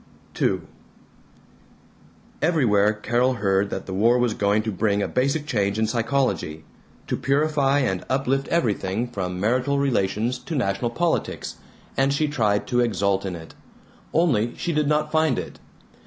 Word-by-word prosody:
II - - +2 1.8
Everywhere 120 -11 +3
Carol 120 +4 0
heard 100 -2 +1
that - - -5
the 95 - -6
war 115 +6 +3
was 120 -2 +1
going 105 +1 +1
to 110 - -2
bring 100 +1 0
a - - -1
basic 140 +4 0
change 100 -7 0
in 110 - +2
psychology, 115 - -1 0.4
to - - -1
purify 145 0 +2
and 95 -8 -1
uplift 135 +1 0
everything 110 - 0
from 90 -6 -4
marital 125 +7 +1
relations 120 -2 0
to 160 - -6
national 110 -2 0
politics, 165 +7 -2 0.4
and 135 +1 +2
she 150 +2 +1
tried 110 -8 +1
to 125 - 0
exult 100 -4 +1
in 90 - -4
it. 80 -1 -11 0.6
Only 140 -9 +2
she 170 - -2
did 150 -1 +1
not 150 0 +1
find 160 0 +2
it. - - -6
120 Hz, 150 wpm, -23 LUFS, 100-140 Hz, 1.8 s, Everywhere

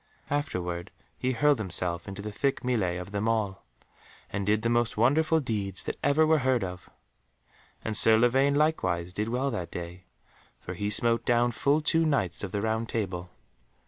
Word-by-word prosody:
Afterward 90 - -2 0.3
he 130 +1 -1
hurled 145 +2 +3
himself 90 -3 0
into 100 0 -7
the 105 - -5
thick 135 +6 -1
mêlée 105 -9 -1
of 90 +2 -8
them 105 +2 -1
all, 105 -4 -1 0.7
and 100 0 -3
did 105 +1 +2
the - - +1
most 120 -2 0
wonderful 155 +8 +3
deeds 105 - -3
that - - -5
ever 155 +3 +3
were 155 0 +3
heard 130 -3 +1
of. 90 -1 -7 1.0
And 110 - -2
Sir 110 +1 +7
Lavaine 135 +4 +3
likewise 95 - 0
did 105 +3 -2
well 130 +3 -1
that 90 -7 -4
day, 90 +2 -8 0.5
for - - -7
he 105 0 -3
smote 115 +2 +1
down 120 0 +2
full 140 +6 +1
two 165 +1 +2
Knights 120 - 0
of 100 - -4
the 100 +1 -2
Round 110 +1 -1
Table. 90 -5 -3
110 Hz, 175 wpm, -27 LUFS, 95-130 Hz, 1.0 s, Sir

